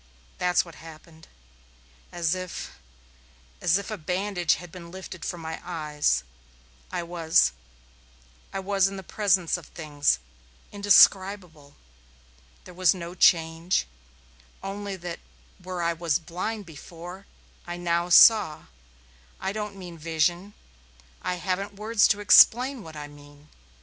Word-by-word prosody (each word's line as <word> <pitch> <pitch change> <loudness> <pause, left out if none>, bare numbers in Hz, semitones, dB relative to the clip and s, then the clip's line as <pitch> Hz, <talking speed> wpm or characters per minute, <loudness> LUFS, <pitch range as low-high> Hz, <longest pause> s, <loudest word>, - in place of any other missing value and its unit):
That's 180 0 +2
what 170 - -13
happened. 160 0 -14 0.8
As 170 -1 0
if 185 - -7 0.8
as 175 +1 +3
if 200 +2 -6
a 215 - -5
bandage 180 +1 0
had 175 -2 -11
been 170 -1 -11
lifted 185 -1 -9
from 175 - -4
my 160 0 -6
eyes, 150 - -1 0.7
I - - -3
was 165 - +2 1.0
I 195 - -4
was 195 0 +2
in 195 0 -6
the 190 - -8
presence 185 -3 +1
of 175 - -13
things 145 - 0 0.5
indescribable. 190 -6 +3 0.9
There 180 - -13
was 185 -1 +3
no 170 -1 -7
change, 165 0 +2 0.8
only 200 0 -5
that 175 -2 -7 0.4
where 180 -1 -5
I 170 0 +1
was 165 -2 0
blind 185 +6 -5
before 175 +4 -11 0.4
I 175 0 -5
now 175 0 -1
saw. 175 -4 +6 0.8
I 190 - -2
don't 210 -1 -5
mean 175 -3 -10
vision. 170 +5 -1 0.7
I 180 - -2
haven't 190 +3 -3
words 215 +1 +3
to 205 -1 0
explain 250 +5 +6
what 160 -4 -11
I 150 -1 -7
mean. 145 0 -17
175 Hz, 130 wpm, -26 LUFS, 165-195 Hz, 1.0 s, saw